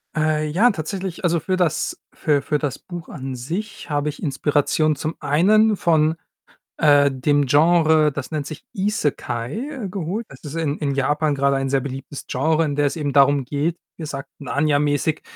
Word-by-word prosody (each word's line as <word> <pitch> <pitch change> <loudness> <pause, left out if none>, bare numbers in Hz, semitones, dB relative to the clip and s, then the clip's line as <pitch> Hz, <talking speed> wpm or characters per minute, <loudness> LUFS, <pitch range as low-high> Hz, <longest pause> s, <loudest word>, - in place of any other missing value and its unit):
Äh, 155 0 +1
ja, 210 +10 +4
tatsächlich, 185 +2 -5
also, 170 -1 +2
für 185 +2 -1
das 175 -5 0 0.2
für 145 -3 +1
für 150 - 0
das 140 -4 -3
Buch 175 -2 -9
an 130 -2 -6
sich 170 - -5
habe 145 0 0
ich 145 - -8
Inspiration 150 +1 +1
zum 155 +3 -4
einen 200 +9 +4
von, 160 -1 +2 0.6
äh, 145 -2 +5
dem 145 +2 +1
Genre, 155 0 +4
das 140 +2 -6
nennt 150 -3 -2
sich 155 - -9
Isekai, 200 - -2
geholt. 195 +5 -3
Das 135 - -14
ist 150 +1 -7
in 155 -2 -1
in 140 -3 -1
Japan 150 +2 +1
grade 140 0 +2
ein 135 0 -1
sehr 135 0 +2
beliebtes 135 +1 -7
Genre, 155 +5 +1
in 145 -1 -2
der 145 0 +2
es - - -3
eben 145 -3 -2
darum 140 -1 +4
geht, 150 +5 -1 0.2
gesagt 145 -4 -6
Narnia-mäßig, 145 +1 0
150 Hz, 170 wpm, -22 LUFS, 140-165 Hz, 0.6 s, äh